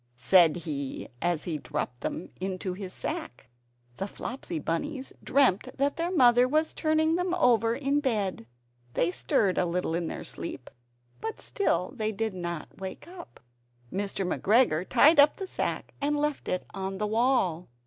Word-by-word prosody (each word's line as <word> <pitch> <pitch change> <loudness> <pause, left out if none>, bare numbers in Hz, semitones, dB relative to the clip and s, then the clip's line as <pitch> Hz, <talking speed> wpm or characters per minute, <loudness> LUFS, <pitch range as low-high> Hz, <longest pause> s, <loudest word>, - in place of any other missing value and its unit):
said 160 +6 +5
he 145 -6 -4
as 175 -3 0
he 160 -4 -3
dropped 135 -5 -4
them 170 - -4
into 185 -1 -3
his 185 0 -6
sack. 320 - -5 0.5
The 195 - -3
Flopsy 235 -4 -5
Bunnies 265 - -3
dreamt 255 -2 +2
that 280 +1 +1
their 335 +1 -1
mother 250 -7 +5
was 310 +4 +1
turning 315 +1 +2
them 360 0 0
over 230 - +3
in 280 +2 +1
bed. 205 - -1 0.5
They 170 - +2
stirred 185 +1 +1
a 180 - +2
little 170 -1 -1
in 170 0 -1
their - - -5
sleep, 140 -6 -6 0.5
but 445 0 -5
still 185 - -1
they 215 -3 0
did 220 0 -2
not 175 -2 -6
wake 190 - -7
up. 350 -1 -12 0.5
Mr. 195 0 -1
McGregor 185 -3 +2
tied 310 +1 +6
up 285 +1 +7
the 385 - -5
sack - - -3
and 295 +1 +1
left 295 -1 -1
it 185 - -1
on 195 0 -4
the 210 - -1
wall. 215 -7 +1
210 Hz, 160 wpm, -28 LUFS, 180-285 Hz, 0.5 s, up